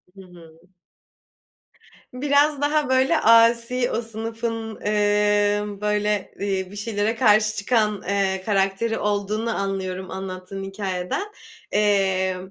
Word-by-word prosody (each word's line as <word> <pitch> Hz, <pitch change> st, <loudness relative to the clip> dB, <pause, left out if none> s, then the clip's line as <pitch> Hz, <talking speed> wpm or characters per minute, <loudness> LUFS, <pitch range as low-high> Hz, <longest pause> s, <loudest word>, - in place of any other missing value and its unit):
Hı 195 Hz, -, -12 dB
hı. 170 Hz, -3 st, -16 dB, 1.5 s
Biraz 285 Hz, +2 st, +2 dB
daha, 295 Hz, -1 st, +1 dB
böyle, 265 Hz, +5 st, +3 dB
asi, 230 Hz, +2 st, +4 dB
o 230 Hz, -, -1 dB
sınıfın, 225 Hz, 0 st, -5 dB
emm, 205 Hz, 0 st, +1 dB
böyle, 210 Hz, -1 st, -1 dB
eee, 190 Hz, -1 st, -2 dB
bir -, -, -10 dB
şeylere 210 Hz, +1 st, -1 dB
karşı 215 Hz, -2 st, +3 dB
çıkan, 210 Hz, -2 st, 0 dB
eee, 195 Hz, -1 st, 0 dB
karakteri 200 Hz, +2 st, 0 dB
olduğunu 210 Hz, +2 st, -1 dB
anlıyorum 190 Hz, -1 st, -3 dB
anlattığın 190 Hz, 0 st, -6 dB
hikâyeden. 195 Hz, -, -3 dB, 0.5 s
Eee, 190 Hz, -3 st, +2 dB
210 Hz, 105 wpm, -23 LUFS, 195-230 Hz, 1.5 s, asi